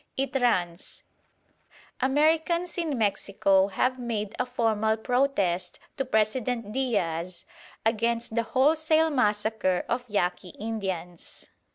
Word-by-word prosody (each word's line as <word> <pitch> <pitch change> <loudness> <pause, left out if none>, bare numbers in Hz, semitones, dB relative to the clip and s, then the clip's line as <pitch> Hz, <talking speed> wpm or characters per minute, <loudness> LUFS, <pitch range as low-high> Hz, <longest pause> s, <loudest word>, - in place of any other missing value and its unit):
It 270 +1 -2
runs: 180 -8 -1 1.0
"Americans 320 +6 +2
in 315 -6 -1
Mexico 195 -2 +2
have 255 +6 0
made 220 -4 -3
a 250 - 0
formal 220 -3 +1
protest 220 -8 0 0.2
to 270 - -1
President 225 -1 0
Diaz 180 -9 -2 0.4
against 230 +1 0
the 230 - +2
wholesale 310 +7 +2
massacre 210 -6 +1
of 245 +1 -1
Yaqui 180 -3 -1
Indians. 190 -6 -5
225 Hz, 100 wpm, -27 LUFS, 200-260 Hz, 1.0 s, Americans